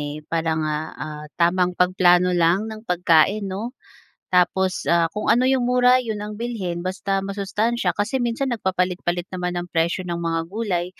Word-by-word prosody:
eh, 145 +1 -5
para 165 0 -1
nga, 155 -1 -1 0.2
ah, 150 0 -7 0.2
tamang 180 +1 +2
pagplano 180 0 +4
lang 175 +3 +2
ng 215 +1 -10
pagkain, 180 +3 +3
‘no? 215 +6 -4 0.6
Tapos, 185 +1 +1
ah, 170 -1 +4
kung 210 - -3
ano 240 +2 +4
‘yong 260 -1 +2
mura, 250 0 +4
‘yon 220 -3 -4
ang 210 0 -6
bilhin, 215 -8 -3
basta 195 +1 -1
masustansya, 205 +4 -1
kasi 230 +6 0
minsan, 240 +3 -1
nagpapalit-palit 180 -3 -1
naman 180 -1 -2
ng 175 - -4
presyo 170 +3 +1
ng 170 -1 -3
mga 165 -1 -1
gulay. 195 -5 -1
185 Hz, 165 wpm, -22 LUFS, 170-215 Hz, 0.6 s, pagplano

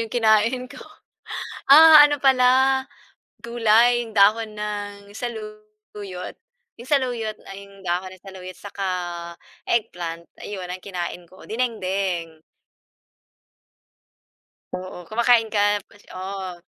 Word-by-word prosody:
'yong 225 - -3
kinain 225 +3 +3
ko, - - -11 0.9
ah, 310 +2 +10
ano 290 - 0
pala 265 0 +4 0.6
gulay, 235 +1 +3
yung 220 - -13
dahon 215 +2 +3
ng 205 -1 -6
saluyot, 215 -4 -8 0.4
'yong 240 - -11
saluyot 245 -6 0
'yong 200 -1 -13
dahon 185 +1 -3
ng 185 - -21
saluyot 185 -2 -10
saka 200 -1 -6 0.8
eggplant, 170 -7 -2 0.2
ayun 185 -3 -7
ang 185 - -5
kinain 175 -2 -6
ko, 185 - -17
dinengdeng. 190 -8 -2 2.4
Oo, 185 0 -8
kumakain 230 0 +3
ka 205 - +2 0.3
fresh, 205 - -22
oo. 185 -2 -6
210 Hz, 105 wpm, -23 LUFS, 190-235 Hz, 2.4 s, ah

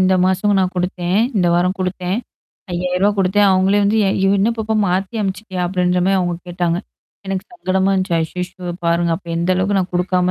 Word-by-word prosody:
இந்த 185 0 +4
மாசம் 195 +2 +2
நான் 185 0 0
குடுத்தேன். 180 +1 -1 0.2
இந்த 180 -3 +2
வாரம் 180 +2 +1
குடுத்தேன். 185 +1 -2 0.5
ரூ.5௦௦௦ 180 +3 +1
குடுத்தேன். 195 +2 +3
அவுங்களே 190 +2 +3
வந்து 205 +2 +2
ய - - +2 0.3
என்ன 205 +4 +3
பாப்பா 220 0 -2
மாத்தி 190 +4 -1
அனுப்புச்சுட்டியா? 190 -2 -3
அப்பிடின்றமாரி 180 +1 +1
அவுங்க 175 -1 0
கேட்டாங்க. 175 -1 -1 0.5
எனக்கு 195 0 -3
சங்கடமா 190 - 0
இருந்துச்சு. 185 -2 0
ஐயய்யோ! 180 +2 -5
பாருங்க. 170 0 +2
அப்ப 175 - -16
எந்த 170 +2 0
அளவுக்கு 190 +2 0
நான் 185 -1 -2
குடுக்காம 180 0 +1
185 Hz, 170 wpm, -18 LUFS, 180-195 Hz, 0.5 s, இந்த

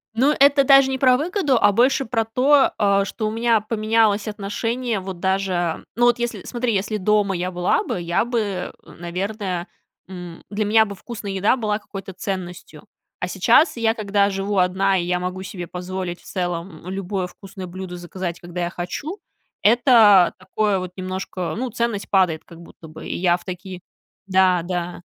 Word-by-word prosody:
Ну, 275 +6 +3
это 280 0 +6
даже 275 0 +6
не 265 - -1
про 255 -1 +4
выгоду, 305 - +1
а, - - +6
больше 255 +5 +2
про 225 -1 0
то, 265 +5 +4
э, 200 -1 +3
что 215 +2 -3
у - - -2
меня 230 -1 +2
поменялось 215 -1 +1
отношение 225 +2 -2
вот 185 -1 -7
даже 190 -3 -1
Ну, 240 - +3
вот 240 0 +3
если, 240 0 -3
смотри, 240 -1 -2
если 205 +2 -1
дома 205 0 +1
я 180 +1 -2
была 180 0 +1
бы, 180 - -3
я 170 +5 0
бы, 210 -7 -2
н - - -15
наверное, 185 +1 -3 0.4
м, 180 -3 -9
для 210 0 -1
меня 220 +1 +5
бы 200 -1 -7
вкусная 210 -1 -7
еда 195 +6 +2
была 210 -3 -1
какой-то 195 -2 -9
ценностью. 185 -2 -6 0.3
А - - -2
сейчас 325 - +3
я, 225 -1 +2
когда 200 -2 +1
живу 195 +1 -2
одна, 190 +2 +2
и 175 - 0
я 180 +1 0
могу 185 +1 -4
себе 180 -2 -7
позволить 180 0 -5
в - - -23
целом 175 -2 -4
любое 190 -1 -3
вкусное 190 0 -10
блюдо 180 0 -7
заказать, 175 0 -5
когда 175 0 -6
я 175 - -1
хочу 180 - -5 0.5
это 220 -5 +6
такое 195 +2 0
вот 185 -1 -6
немножко 185 -1 -4
ну, 255 +2 -2
ценность 235 -3 -2
падает 180 -5 +2
как 170 -1 -14
будто 165 -1 -14
бы. 155 +1 -10
И - - -3
я 175 -1 +3
в - - -18
такие... 185 0 -7 0.5
Да, 185 -2 +3
да. 175 0 -4
195 Hz, 180 wpm, -22 LUFS, 180-225 Hz, 0.5 s, это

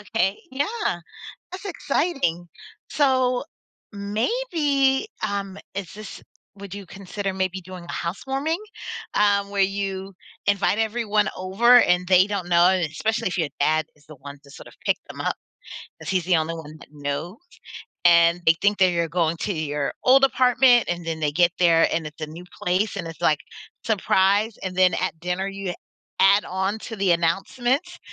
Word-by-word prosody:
Okay, 205 -2 0
yeah. 290 - -2 0.5
That's 375 +2 -8
exciting. 275 - -1 0.4
So, 260 -3 +2 0.5
maybe, 275 - 0 0.2
um 200 -1 -4 0.2
is 195 -3 -5
this 215 -1 -9 0.4
would 200 -1 -9
you 200 - -8
consider 195 +1 -5
maybe 190 0 -2
doing 180 -1 -10
a - - -7
housewarming, 270 - -2 0.5
um, 200 -1 +2
where 200 -1 0
you 195 0 -2 0.3
invite 200 0 +2
everyone 215 -2 +1
over 230 +7 +5
and 180 0 +2
they 185 +1 +5
don't 200 -4 -3
know, 175 +1 +5
and 185 -3 +2
especially 215 +9 -2
if 185 - -3
your 160 -4 0
dad 155 +2 +2
is 150 -1 -26
the 155 - -12
one 140 +2 -10
to 140 - -17
sort - - -12
of - - -15
pick - - +3
them - - -9
up, - - -1 0.6
'cause - - -7
he's 185 -3 0
the 180 -2 +3
only 160 +1 -1
one 155 -2 -9
that - - -15
knows, 145 +6 -4 0.7
and 170 0 +5
they 160 - +8
think 205 +1 +2
that 185 -1 +5
you're 170 -1 0
going 165 -1 0
to 200 - -2
your 150 -2 -2
old 270 +1 +6
apartment, 250 -2 +4
and 175 -1 -3
then 160 -1 -3
they 150 -2 0
get 170 +2 +3
there 165 -2 +5
and 160 -2 -1
it's 155 +1 -11
a 155 - -3
new 165 +4 -10 0.2
place 185 +4 0
and 180 -4 -4
it's, 165 - -10
like, 150 -2 +3 0.4
"Surprise," 205 -1 +2
and 185 -1 -4
then 185 -1 +5
at 185 -3 -2
dinner, 180 +2 -2
you 195 -2 -4 0.5
add 200 +2 +5
on 190 +3 -2
to 225 0 -8
the 195 -2 +2
announcements 245 - 0
190 Hz, 175 wpm, -23 LUFS, 170-220 Hz, 0.7 s, they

